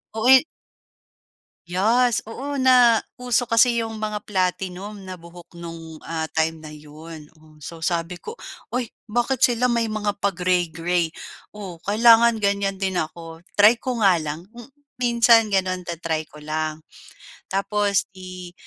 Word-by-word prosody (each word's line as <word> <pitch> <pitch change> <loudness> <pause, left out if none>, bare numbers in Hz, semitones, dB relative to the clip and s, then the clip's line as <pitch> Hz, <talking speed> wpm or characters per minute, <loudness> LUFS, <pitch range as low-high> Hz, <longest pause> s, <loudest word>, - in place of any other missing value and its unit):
O, 225 +2 0
eh 265 +1 +8 1.2
Yes. 225 +7 +2
Oo, 275 +5 -5
nauso 245 -1 +3
kasi 235 +1 +4
yung 225 -1 -4
mga 215 -1 -3
platinum 190 +1 -2
na 185 -1 -8
buhok 170 0 -14
no'ng, 165 -1 -9
ah, 160 -1 -3
time 160 0 0
na 155 - -11
'yon. 150 +1 -12
O, 155 0 -20
so 165 +2 -8
sabi 170 +1 -2
ko, 445 - -8 0.3
"Ay, 245 -3 -3 0.2
bakit 240 +4 0
sila 245 0 +1
may 235 -1 +1
mga 215 -1 -1
pa-gray-gray? 180 -3 0 0.5
O, 190 -5 -8
kailangan 225 +3 +4
ganyan 200 0 0
din 190 -1 -1
ako, 165 +1 -6 0.2
try 215 +3 +6
ko 245 -4 -2
nga 185 -4 +5
lang." 155 +1 -5
M 240 0 -12 0.4
minsan 235 -2 +5
gano'n, 185 -2 0
ta-try 165 -2 -3
ko 150 - -13
lang. 155 +1 -3 0.7
Tapos 200 0 0
i 185 -1 -10
190 Hz, 140 wpm, -22 LUFS, 165-230 Hz, 1.2 s, eh